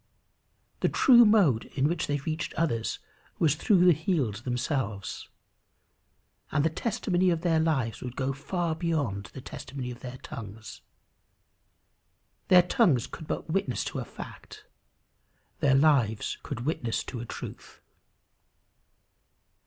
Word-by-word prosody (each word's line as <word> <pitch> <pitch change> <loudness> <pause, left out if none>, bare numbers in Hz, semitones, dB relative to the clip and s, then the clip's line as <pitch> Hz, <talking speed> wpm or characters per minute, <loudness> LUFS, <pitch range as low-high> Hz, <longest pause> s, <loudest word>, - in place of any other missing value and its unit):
The - - +2
true 240 -3 +7
mode 190 - +4
in 140 +1 +2
which 170 0 -1
they 145 - 0
reached 155 +3 -4
others 115 -9 0 0.4
was 155 -4 +3
through 180 +4 +3
the 180 - +7
healed 150 - -1
themselves. 120 -3 -3 1.2
And 150 0 +2
the 160 - +2
testimony 185 -2 0
of 170 -2 0
their 165 -2 +2
lives 130 -9 0
would 125 -1 -6
go 135 0 -1
far 165 +4 -2
beyond 150 - -1
the 130 - -10
testimony 130 -1 -7
of 120 - -9
their 125 0 -8
tongues. 110 -2 -9 1.7
Their 180 -1 +7
tongues 180 - +3
could 160 - -10
but 155 - -4
witness 170 -9 0
to - - -4
a - - -3
fact; - - -11 0.9
their 135 -2 +4
lives 135 -7 +2
could 125 -3 -6
witness 125 -7 -1
to 125 - -6
a 120 - -5
truth. - - -9
145 Hz, 130 wpm, -28 LUFS, 125-170 Hz, 1.7 s, true